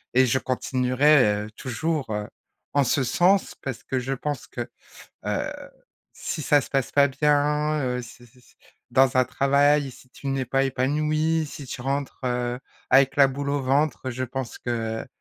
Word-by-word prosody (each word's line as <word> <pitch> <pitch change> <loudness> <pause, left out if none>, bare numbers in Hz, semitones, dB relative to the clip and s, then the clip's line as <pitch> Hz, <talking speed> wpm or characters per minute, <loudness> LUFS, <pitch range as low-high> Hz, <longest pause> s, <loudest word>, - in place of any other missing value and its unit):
et 130 +1 +6
je 130 +2 +1
continuerai, 130 -3 +2
heu, 110 - -11
toujours, 145 +1 -2
heu, 105 -1 -3 0.5
en 145 - +4
ce 135 +2 +1
sens, 180 +10 +2
parce 130 -4 -5
que 130 - -2
je 135 +2 -2
pense 145 0 -4
que, - - -5 0.6
heu, - - -1 0.6
si 155 - -5
ça 145 +1 +4
se - - -8
passe 135 -4 -1
pas 140 0 +5
bien, 150 +2 +1
heu, 125 -1 -2
si 120 +1 -13
si 120 +2 -24
s 125 - -24 0.3
dans 130 -1 +4
un 130 - +5
travail, 140 +2 +2
si 125 +1 -18
tu 140 - -11
n'es 135 -1 0
pas 135 +3 +1
épanoui, 155 +4 0
si 145 0 -9
tu 125 - -6
rentres, 140 +2 -3
heu, 125 0 -1 0.3
avec 135 +1 +5
la 140 - +7
boule 140 +1 -4
au 145 -1 0
ventre, 135 0 0
je 130 +2 -3
pense 130 0 -5
que, 115 0 -3
135 Hz, 180 wpm, -25 LUFS, 125-145 Hz, 0.6 s, la